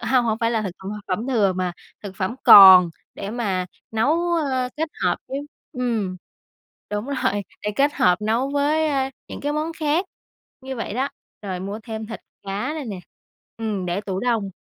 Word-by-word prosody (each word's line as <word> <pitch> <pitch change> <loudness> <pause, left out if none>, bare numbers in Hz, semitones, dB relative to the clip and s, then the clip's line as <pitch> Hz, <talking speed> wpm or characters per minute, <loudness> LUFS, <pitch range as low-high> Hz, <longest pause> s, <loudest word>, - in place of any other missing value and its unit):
hông, 255 -2 +2
hông 220 -1 0
phải 230 0 +1
là 225 -2 0
thực, 190 - -3
ơ, 190 0 -8 0.2
phẩm 195 +6 -2
thừa, 210 -7 +3
mà 185 -1 -2 0.3
thực 190 -2 -8
phẩm 190 +6 -2
còn 185 -3 +10 0.2
để 200 +1 -5
mà 195 -6 -1 0.2
nấu, 315 +10 +1
ơ, 265 -6 0
kết 320 +1 -1 0.2
hợp - - +2
với 270 - -3 0.3
ừm, 230 - -2 0.7
đúng 210 +4 -3
rồi, 255 -7 -1 0.2
để 210 - -1
kết 285 +1 +2
hợp 180 +2 +3
nấu 230 +5 +1
với, 295 +2 +2
a, 270 -2 0 0.2
những - - -7
cái 290 +1 -1
món 310 +2 -2
khác 320 +2 0 0.6
như 265 0 -6
vậy 225 -3 -4
đó. 265 +4 0 0.3
Rồi 185 -3 -4
mua 200 +3 -5
thêm 220 -1 -6
thịt 225 - -7 0.2
cá 200 +8 -3
rồi 300 -3 -5
nè, 200 -5 -5 0.6
ừm, 215 -5 -3
để 175 +3 -1
tủ 195 -2 -4
đông. 230 -5 0
225 Hz, 190 wpm, -23 LUFS, 195-270 Hz, 0.7 s, còn